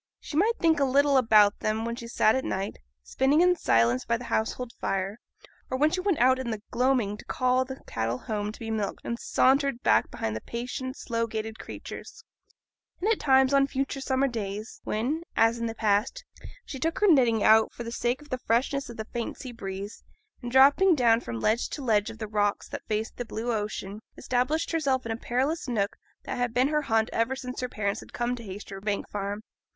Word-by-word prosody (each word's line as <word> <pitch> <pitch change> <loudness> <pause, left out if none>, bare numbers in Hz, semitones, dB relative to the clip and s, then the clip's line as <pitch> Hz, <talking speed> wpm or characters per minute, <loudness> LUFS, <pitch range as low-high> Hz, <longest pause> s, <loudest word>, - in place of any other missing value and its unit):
She - - -8
might 435 +9 +3
think 320 -3 +3
a - - +3
little 280 +1 +3
about 215 -5 +5
them 220 +1 -1
when 235 0 -2
she 235 -1 -8
sat 220 -2 +3
at 260 - 0
night, 195 +1 -3 0.2
spinning 270 - +2
in 360 0 +5
silence 120 - +2
by 235 0 0
the 245 - -9
household 235 +2 -1
fire, 195 +3 -2 0.5
or 260 - -1
when 300 +3 +3
she 365 - -1
went 375 -4 +1
out 260 +2 +4
in 260 -2 -3
the 215 -2 -4
gloaming 245 -5 +1
to - - -13
call 255 0 +1
the 265 +1 -8
cattle 115 +1 -2
home 210 - -3
to - - -13
be 225 -1 -5
milked, 215 -2 -2
and 235 0 -3
sauntered 270 -1 +2
back 110 +2 +3
behind 110 -1 -3
the 110 - -4
patient, 250 +3 -5
slow 230 -1 -2
gaited 220 0 -5
creatures; - - -9 0.8
and 420 +5 +1
at 445 - +1
times 265 -1 +4
on 275 0 +4
future 275 0 -3
summer 270 0 +1
days, 215 -3 -5
when, 255 +10 -1 0.2
as 225 +1 +4
in 230 - -1
the 225 - -5
past, 210 +2 0 0.4
she 270 - -7
took 325 +4 -1
her 420 - +3
knitting 245 - +4
out 220 0 +5
for 240 - -7
the 230 - -6
sake 245 +4 -1
of 295 - -18
the 255 - -2
freshness 255 +4 0
of 235 - -9
the 220 - -4
faint 235 +1 -5
sea 255 - -7
breeze, 200 -2 -7 0.4
and 240 -1 -5
dropping 285 +8 +6
down 235 -4 +4
from 115 - -5
ledge 220 - +1
to 290 - -6
ledge 215 -3 +2
of 225 - -9
the 220 -1 -5
rocks 205 -1 0
that - - -6
faced 220 +1 -2
the 245 - -2
blue 230 +2 -3
ocean, 210 -1 -4 0.2
established 255 +6 0
herself 275 -6 0
in 225 - -3
a - - -1
perilous 265 +7 -1
nook 210 -5 -1 0.3
that - - -4
had 245 -1 -1
been 255 +3 +3
her 300 0 +1
haunt 225 -5 +1
ever 230 +3 +1
since 255 -1 -6
her 250 - -2
parents 200 -3 -2
had - - -13
come 240 +1 -1
to 240 - -9
Haytersbank 200 0 -5
Farm. 205 +1 -4
235 Hz, 215 wpm, -27 LUFS, 215-265 Hz, 0.8 s, dropping